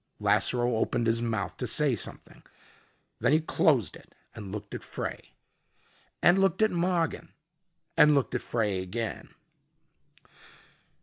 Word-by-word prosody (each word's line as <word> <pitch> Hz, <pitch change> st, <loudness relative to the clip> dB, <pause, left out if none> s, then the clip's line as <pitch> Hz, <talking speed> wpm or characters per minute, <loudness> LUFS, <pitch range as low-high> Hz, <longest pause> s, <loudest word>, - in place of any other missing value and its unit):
Lasseroe 120 Hz, -2 st, +2 dB
opened 120 Hz, +1 st, 0 dB
his 115 Hz, 0 st, +1 dB
mouth 110 Hz, -3 st, -3 dB
to -, -, -3 dB
say -, -, +2 dB
something. -, -, -7 dB, 0.8 s
Then 120 Hz, +5 st, +2 dB
he 155 Hz, -, +5 dB
closed 150 Hz, -, +1 dB
it -, -, -17 dB, 0.2 s
and 105 Hz, -4 st, -8 dB
looked 105 Hz, 0 st, -7 dB
at -, -, -6 dB
Frey -, -, -7 dB, 0.9 s
and 175 Hz, +2 st, +6 dB
looked 195 Hz, +2 st, +2 dB
at 220 Hz, -, +3 dB
Mogin 175 Hz, -2 st, -1 dB, 0.6 s
and 150 Hz, 0 st, +6 dB
looked 140 Hz, -3 st, 0 dB
at 125 Hz, -, -1 dB
Frey 105 Hz, -5 st, -1 dB
again. 110 Hz, +5 st, -5 dB
120 Hz, 130 wpm, -28 LUFS, 110-160 Hz, 0.9 s, and